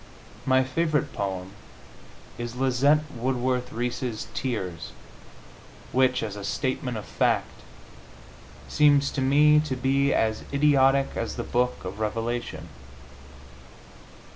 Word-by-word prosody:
My 130 0 +4
favorite 150 +2 -1
poem 95 -2 -4 0.9
is 120 0 -5
Lizette 135 +4 +3
Woodworth 125 +1 -1
Reese's 120 -1 -3
"Tears," 95 -10 -4 1.0
which, 130 0 +2
as 105 -2 -4
a 100 - -7
statement 125 +2 -2
of 105 - -7
fact, - - -1 1.1
seems 145 - +4
to 140 - -2
me 150 +3 +5
to 150 -3 -2
be 135 +2 +1
as 110 -1 0
idiotic 140 -1 +3
as 115 - -3
the 120 - -3
Book 125 -4 -1
of 95 +3 -6
Revelation. 115 +2 -3
130 Hz, 110 wpm, -26 LUFS, 115-140 Hz, 1.1 s, me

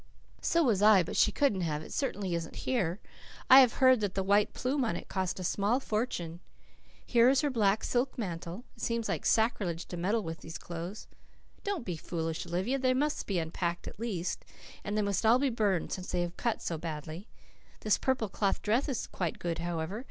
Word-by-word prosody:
"So 335 0 +2
was 220 -8 +2
I. 210 -3 +7
But 170 - -6
she 215 - +4
couldn't 210 -5 +1
have. 155 -3 -2
It - - -9
certainly 205 -9 -2
isn't 165 -1 -4
here. 195 -8 0 0.5
I 260 - +12
have 255 -3 +6
heard 260 -2 +5
that 205 -3 -2
the 195 - 0
white 200 +2 +3
plume 265 +2 -1
on 220 -8 0
it - - -7
cost 185 -1 -2
a - - -4
small 205 +7 +1
fortune. 210 -9 -3 0.7
Here 240 0 +5
is 270 0 +4
her 295 -2 0
black 215 -3 +2
silk 250 +2 0
mantle. 180 0 -5
It 225 - -13
seems 230 0 -1
like - - -1
sacrilege 205 -7 +1
to 175 - -5
meddle 205 +6 0
with 165 -1 -5
these 165 - -7
clothes." 175 +4 -7 0.6
"Don't 395 -11 -2
be 175 -3 -3
foolish, 165 +1 -4
Olivia. 190 +11 -1
They 255 -1 +2
must 295 +3 -1
be 195 - 0
unpacked 170 +1 -2
at - - -9
least. 195 -7 -3 0.4
And 205 +1 -2
they 210 - +2
must 200 0 0
all 225 +2 +6
be 270 0 +1
burned 205 -6 0
since 185 -1 -4
they 180 - 0
have 175 0 -3
cut 235 -2 -2
so 165 -2 -3
badly. 160 +4 -6 0.5
This 215 - +2
purple 260 -4 0
cloth 200 0 -1
dress 235 +8 +1
is 260 - -2
quite 175 -4 -3
good, 170 -1 -3
however. 170 +4 -3
200 Hz, 205 wpm, -30 LUFS, 175-240 Hz, 0.7 s, I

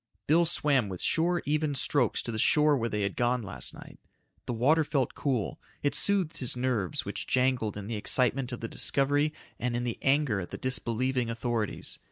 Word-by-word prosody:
Bill 170 +3 +4
swam 140 -9 +2
with 90 -2 -6
sure 175 +2 +1
even 150 0 0
strokes 130 -2 +1
to 115 - -4
the 110 - -4
shore 150 +5 +4
where 115 -3 -1
they 105 -2 -2
had 100 - -2
gone 120 0 0
last 100 - -4
night. - - -13 0.5
The - - -1
water 145 +8 +3
felt 140 -4 -1
cool. 115 - -2 0.2
It 145 - +1
soothed 190 -5 +2
his 125 -1 -2
nerves 120 - -1
which - - -5
jangled 125 -5 +1
in 100 - -6
the 110 +1 -3
excitement 125 +4 +2
of 120 - -6
the 115 - -3
discovery 145 +5 +2 0.3
and 120 0 -1
in 120 - -1
the 120 -2 -3
anger 135 -6 +2
at 90 - -6
the - - -6
disbelieving 125 0 -1
authorities. 115 -1 -3
125 Hz, 195 wpm, -29 LUFS, 115-145 Hz, 0.5 s, Bill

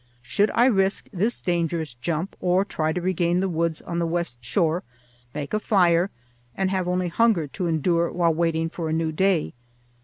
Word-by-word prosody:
Should 200 - +1
I 240 - +5
risk 195 -5 +2
this 215 +6 0
dangerous 165 -4 -1
jump, 155 +9 -3
or 185 +2 +2
try 155 -5 -1
to 180 - -2
regain 175 -1 +1
the 190 - +1
woods 165 -2 -1
on 170 0 -3
the 170 - 0
west 165 -8 -3
shore, 165 - +1 0.5
make 145 +2 -5
a 215 - +2
fire, 180 -4 +3 0.5
and 190 -1 0
have 185 -2 -1
only 180 0 0
hunger 210 -3 +2
to 175 +5 -3
endure 170 +1 +1
while 170 -2 +2
waiting 165 0 0
for 165 -1 -4
a - - -1
new 160 0 0
day? 185 0 +1
170 Hz, 185 wpm, -24 LUFS, 160-185 Hz, 0.5 s, I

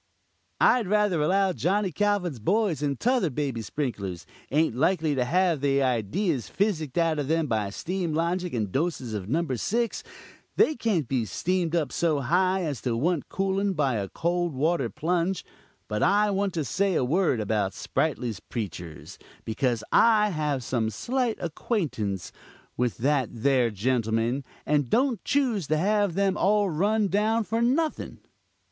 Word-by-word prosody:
"I 250 - +5
rather 205 -5 +1
allow 190 +4 +2
Johnny 195 +3 0
Calvin's 190 - 0
boys 185 - +1
and 140 -3 -1
'tother 245 -8 +2
baby 135 -4 -2
sprinklers,' 105 - -4 0.2
ain't 150 -4 +1
likely 160 +2 +1
to 130 -3 +1
have 170 +2 +1
they 140 -1 +2
idees 125 - 0
physicked 170 -9 -1
out 165 -2 +2
of 145 - -2
them 165 +1 +1
by 110 -6 -1
steam 175 - -3
logic, 175 +2 -1
and 105 -4 -2
doses 135 - -2
of 100 -2 -4
No. 165 +6 +1
6. 230 - -1 0.5
They 310 - +4
can't 200 - 0
be 125 -3 0
steamed 175 - -1
up 155 -6 0
so 155 -4 +1
high 185 +7 +2
as 145 -8 -3
to 120 -3 -1
want 165 +4 0
cooling 195 +1 0
by 145 -6 +1
a 100 -2 -3
cold 175 -2 -1
water 145 -2 +1
plunge. 175 - -1 0.4
But 105 0 -2
I 205 +1 +3
want 195 -1 -1
to 160 -3 -1
say 190 +5 0
a 125 - +2
word 160 -2 +1
about 105 -2 -1
Sprightly's 125 -9 -2
preachers, 90 -8 -7 0.3
because 115 0 -1
I 215 -2 +5
have 150 -5 -1
some 115 -2 -1
slight 240 - -1
acquaintance 150 - -2 0.4
with 125 -1 -1
that 135 -1 +1
there 125 0 +2
gentleman, 115 +3 0 0.2
and 145 -4 +1
don't 250 - +1
choose 245 - 0
to 155 - +1
have 205 +1 +1
them 195 -1 +1
all 205 -1 +2
run 205 +6 +1
down 215 +4 +1
for 225 +2 -1
nothing. 295 +7 0
160 Hz, 155 wpm, -26 LUFS, 125-195 Hz, 0.5 s, I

